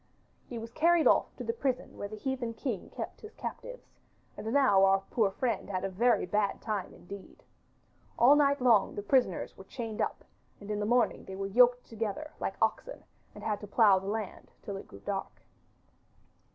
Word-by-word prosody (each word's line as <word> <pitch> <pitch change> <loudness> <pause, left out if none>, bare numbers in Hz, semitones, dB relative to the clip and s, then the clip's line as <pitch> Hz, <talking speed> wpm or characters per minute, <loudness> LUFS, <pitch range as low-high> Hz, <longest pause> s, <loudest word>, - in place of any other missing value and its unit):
He 240 - -6
was 230 0 -7
carried 335 +4 +3
off - - +3
to - - -6
the 460 - -1
prison 265 - -2
where 205 - -5
the 215 - -8
heathen 240 0 -3
king 225 -2 -4
kept - - -7
his 430 - -11
captives, - - -8 0.4
and 220 - -5
now 255 -8 +5
our 195 0 +4
poor 220 -4 +3
friend 220 0 -2
had 185 -2 -2
a - - -1
very 235 +5 +2
bad 200 +2 0
time 210 -4 -3
indeed. 195 +2 -12 0.7
All 260 +5 +7
night 285 -1 +3
long 235 -6 +4
the 205 - -4
prisoners 245 -5 +1
were - - -11
chained 225 +1 -5
up, - - -2 0.3
and 205 +1 -7
in 210 - -1
the 210 - -1
morning 240 +1 +2
they 190 - -7
were 195 +1 -3
yoked 245 +4 +4
together 225 +7 -4
like - - -2
oxen - - -2 0.3
and - - -10
had 210 -2 -1
to 210 - -7
plough 200 -2 +5
the 190 - -8
land 215 -1 -4
till 200 - -5
it 195 - -8
grew 100 - -13
dark. - - -5
220 Hz, 190 wpm, -30 LUFS, 200-255 Hz, 0.7 s, All